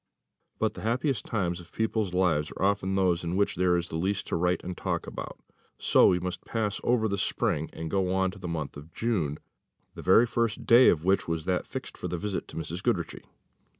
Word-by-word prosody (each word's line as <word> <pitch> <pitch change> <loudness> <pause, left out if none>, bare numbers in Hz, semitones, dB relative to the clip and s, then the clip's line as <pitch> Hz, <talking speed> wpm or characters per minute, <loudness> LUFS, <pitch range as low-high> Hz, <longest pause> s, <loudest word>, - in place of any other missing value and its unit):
But - - 0
the - - -9
happiest 120 - -1
times 90 -5 -1
of 85 - -13
people's 110 -3 -1
lives 90 -5 +1
are - - -2
often 95 -1 +1
those 90 -3 +2
in 85 +1 -2
which 100 +1 +1
there 90 -1 +3
is 85 -1 -4
least 95 +5 -1
to - - 0
write 90 +1 +1
and 90 0 -5
talk - - -2
about; - - -7 0.4
so - - +5
we 90 - +3
must 90 +1 -4
pass 110 -3 -2
over 120 -2 +2
the 100 -2 -2
spring, 80 -3 0
and 80 0 -6
go 95 -2 +1
on 95 0 +1
to 100 - -12
the 90 - -6
month 80 -4 -4
of 75 +3 -12
June, 85 -12 -1 0.6
the - - -8
very 95 +6 +6
first 115 -2 -1
day 120 +2 +7
of 80 0 +1
which 95 +1 +2
was 80 -1 -2
that 90 -1 0
fixed - - -7
for - - -3
the 90 0 -3
visit 100 +1 -3
to - - -11
Mrs. 80 +3 -4
Goodriche. - - -1
90 Hz, 215 wpm, -28 LUFS, 85-100 Hz, 0.6 s, day